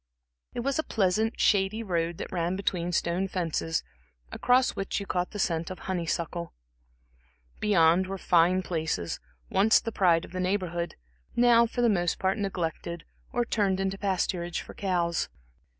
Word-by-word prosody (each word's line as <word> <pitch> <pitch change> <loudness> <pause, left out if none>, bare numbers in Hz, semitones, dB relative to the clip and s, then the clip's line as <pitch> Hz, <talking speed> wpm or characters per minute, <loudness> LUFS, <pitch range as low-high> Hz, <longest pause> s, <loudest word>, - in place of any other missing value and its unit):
It 240 - -1
was 275 +4 0
a - - +1
pleasant, 215 0 +1
shady 205 +3 +2
road, 170 -4 -1
that - - -6
ran 175 0 -1
between 180 -3 -1
stone 175 +2 0
fences, 165 -3 -1 0.5
across 250 +1 +3
which 195 +1 -2
you 200 - -5
caught 180 -2 -1
the - - -7
scent 170 -4 0
of 185 - -6
honey 175 -3 -3
suckle. 170 0 -3 1.1
Beyond 185 -3 +4
were 195 +1 -4
fine 180 +1 +3
places, 160 - -2 0.3
once 205 +3 +5
the 225 - -4
pride 175 -5 +3
of - - -15
the 185 - -4
Neighborhood, 180 -2 -1 0.4
now 235 -1 +5
for 245 - -3
the - - +5
most 175 -6 +1
part 190 +2 0
neglected, 170 -3 -3 0.3
or 240 0 0
turned 200 -5 +1
into 195 0 -1
pasturage 180 -3 -1
for - - -11
cows. 175 -4 0
185 Hz, 160 wpm, -28 LUFS, 170-200 Hz, 1.1 s, once